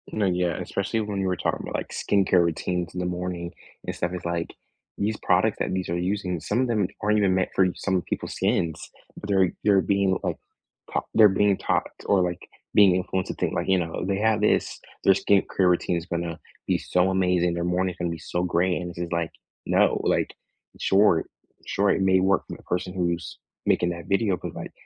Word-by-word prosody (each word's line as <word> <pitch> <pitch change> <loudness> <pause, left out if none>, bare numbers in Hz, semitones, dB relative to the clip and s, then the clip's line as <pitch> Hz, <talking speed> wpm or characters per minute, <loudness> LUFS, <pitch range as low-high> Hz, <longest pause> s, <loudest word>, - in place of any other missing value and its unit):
No, 105 -1 0
yeah, 90 -3 0
especially 100 +3 -2
when 105 -2 -3
you 95 - 0
were 90 - +1
talking - - -1
about, - - -6
like, - - -3
skincare 95 -3 +2
routines 85 +1 -2
in 90 - -4
the 90 - -1
morning 90 -1 -4 0.3
and - - -4
stuff, 85 - -2
it's, 90 -1 -6
like, 85 -1 -2 0.4
these 105 +2 0
products - - +2
that - - -1
these 95 -1 -2
are 85 - -1
using, 90 -1 -2
some 105 +8 -1
of 130 - +1
them 105 -5 +1
aren't 105 0 +2
even 100 -3 +3
meant 95 - +1
for 95 - +4
some 95 - -1
of 90 - -1
people's - - -4
skins. 80 -2 0 0.4
They're 95 -3 +2
they're 100 -2 +4
being, 100 -1 +1
like, - - -2 0.6
ta - - +1
they're 110 -2 +7
being 100 0 +2
taught - - 0 0.2
or, 100 -2 +3
like, 90 0 -4 0.3
being 100 -3 +6
influenced 95 0 -2
to - - -3
think, - - -1
like, - - -2
know, 90 -4 0
"They 95 0 0
have 110 0 +2
this, - - +1 0.2
their 95 - +6
skin 100 +1 +3
care 95 -2 +4
routine 90 0 +1
is 85 - -5
gonna 85 -1 -3 0.3
be - - +2
so 90 +1 +1
amazing, 90 -2 +2
their 85 0 -2
morning's 90 +1 0
gonna 85 -1 -2
be 85 - -4
so 90 +2 -2
great," 90 +1 +1
and 90 0 -5
it 85 - -5
is, 85 0 -4
like, 85 -1 -1 0.3
no, - - +3
like, - - +1 0.5
sure 95 -4 +4 0.4
sure, 100 0 +2
it - - +1
may 95 -1 +4
work 95 +1 +2
for - - -7
the - - -19
person 90 +1 -2
who's 85 -3 -2 0.3
making 90 - +2
that 85 0 -6
video, 100 0 +2
but, - - -7
like, - - -7
90 Hz, 215 wpm, -25 LUFS, 85-100 Hz, 0.6 s, they're